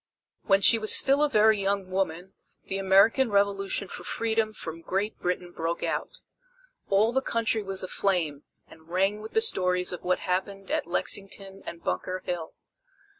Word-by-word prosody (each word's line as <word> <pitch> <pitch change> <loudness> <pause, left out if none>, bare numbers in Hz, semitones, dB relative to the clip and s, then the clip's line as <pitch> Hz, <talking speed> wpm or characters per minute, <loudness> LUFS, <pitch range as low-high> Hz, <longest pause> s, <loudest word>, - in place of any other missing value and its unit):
When 195 -2 +3
she 225 +3 +6
was 215 0 +6
still 275 +1 +5
a 300 - +2
very 215 -4 +4
young 195 -1 -1
woman 185 -1 -2 0.3
the 195 - -4
American 200 +7 +4
Revolution 200 -1 0
for 175 - -8
freedom 220 +3 -1
from 165 -5 -8
Great 195 +5 -3
Britain 180 0 -3
broke 165 0 -3
out. - - -3 0.7
All 205 +3 +3
the 265 +2 +1
country 230 -3 -1
was 195 -1 0
aflame, 175 -6 -1 0.2
and 160 0 -18
rang 195 +4 0
with 220 - -9
the 445 - +3
stories 180 - +1
of 180 - -6
what 180 0 0
happened 195 +1 -3
at - - -1
Lexington 195 +2 -3
and 170 - -8
Bunker 185 0 -3
Hill. 170 -3 -5
195 Hz, 165 wpm, -27 LUFS, 180-215 Hz, 0.7 s, she